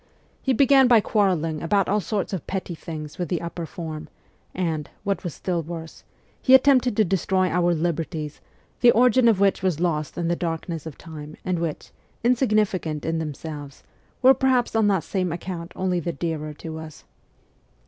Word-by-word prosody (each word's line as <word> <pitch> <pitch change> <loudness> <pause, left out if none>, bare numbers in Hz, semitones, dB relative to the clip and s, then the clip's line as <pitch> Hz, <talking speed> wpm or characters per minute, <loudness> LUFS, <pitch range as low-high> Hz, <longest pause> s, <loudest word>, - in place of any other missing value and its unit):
He 265 - 0
began 270 +1 +5
by 240 -2 +7
quarrelling 180 -8 +1
about 195 +3 +2
all 205 +2 +2
sorts 200 +2 -2
of 185 - -4
petty 185 -2 -3
things 155 -1 -8
with 175 - -2
the 175 - 0
upper 170 -1 -5
form, 160 -2 -7 0.4
and 160 -5 -2
what 200 -3 -1
was 175 - -5
still 175 -3 -2
worse 165 0 -8 0.4
he 260 - +7
attempted 255 -4 +4
to 215 - +4
destroy 185 0 +1
our 175 0 +2
'liberties/ 160 -2 -3 0.4
the 245 - +6
origin 250 +1 +5
of 220 -4 +4
which 200 -1 +3
was 185 -5 0
lost 155 -4 -1
in 170 -1 -1
the 175 - +1
darkness 165 -1 -4
of 155 - -9
time 155 -2 -10
and 185 -2 0
which, 165 -3 -4 0.3
insignificant 215 - +1
in 160 0 0
themselves, 150 -2 -7 0.4
were 260 +1 +9
perhaps 255 -3 +1
on 220 -2 +4
that 190 -6 +2
same 185 0 -1
account 170 0 -5
only 185 -1 0
the 170 +1 -2
dearer 160 -3 -3
to 160 +1 -7
us. 155 -2 -10
175 Hz, 175 wpm, -24 LUFS, 160-200 Hz, 0.4 s, were